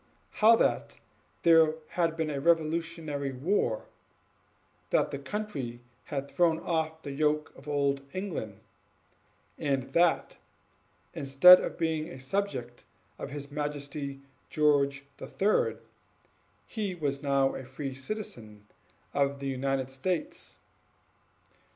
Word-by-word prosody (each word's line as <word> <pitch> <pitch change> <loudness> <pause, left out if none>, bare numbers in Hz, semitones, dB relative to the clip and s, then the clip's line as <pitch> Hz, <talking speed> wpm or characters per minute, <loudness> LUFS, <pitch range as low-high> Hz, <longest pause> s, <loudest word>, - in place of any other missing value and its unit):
How 225 +2 +8
that - - 0 0.4
there 160 -2 +6
had 165 -2 0
been 160 -2 -1
a 140 -1 -3
revolutionary 160 -3 0
war 130 - 0 1.0
that - - +2
the 140 - -4
country 140 - -4 0.3
had 140 -1 -4
thrown 170 -3 +3
off 160 -1 -2
the 140 - -5
yoke 150 +1 0
of 140 - -15
old 140 -1 +1
England 155 - -5 1.0
and 135 -4 -1
that, 170 -5 +2 0.8
instead 155 +4 +8
of - - -4
being 160 -1 -1
a 130 - -9
subject 130 -6 -3 0.4
of - - -5
his 140 0 -7
Majesty 145 -1 -4 0.3
George 140 -2 +2
the - - -8
Third, 205 +2 +1 0.8
he 205 -5 -3
was 140 -4 -2
now 140 -2 +2
a 135 - -6
free 135 +2 -6
citizen 125 - -7 0.5
of 140 0 +1
the 140 - -4
United 135 0 -1
States. 165 +6 -3
145 Hz, 115 wpm, -29 LUFS, 135-165 Hz, 1.0 s, How